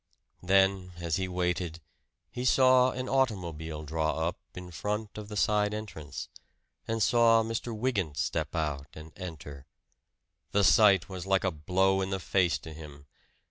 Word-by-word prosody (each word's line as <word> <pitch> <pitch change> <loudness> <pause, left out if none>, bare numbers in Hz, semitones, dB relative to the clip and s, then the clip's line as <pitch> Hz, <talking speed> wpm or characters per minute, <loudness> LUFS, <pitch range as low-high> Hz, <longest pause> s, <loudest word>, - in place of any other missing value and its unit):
Then, 95 0 +2
as 85 -2 -1
he 95 -1 -2
waited, 90 -2 -2 0.5
he 125 - -5
saw 130 0 +5
an 130 0 -4
automobile 85 - -1
draw 80 +1 -1
up 90 - -4 0.2
in 90 0 -8
front 105 +5 -4
of 105 -1 -8
the 105 - -5
side 105 0 +2
entrance, 80 -10 -7 0.6
and 115 -1 0
saw 115 -1 +5
Mr. 115 +1 -3
Wygant 100 - -1
step - - -2
out 75 -4 -2
and 80 0 -10
enter. 75 -6 -9 0.9
The 100 - +3
sight 100 -4 +5
was 95 -1 -7
like 95 -1 +2
a 95 - +1
blow 95 +5 +1
in 95 - -2
the 95 0 -2
face 90 -1 +1
to 80 - -10
him. 75 -2 -11
95 Hz, 155 wpm, -29 LUFS, 80-105 Hz, 0.9 s, saw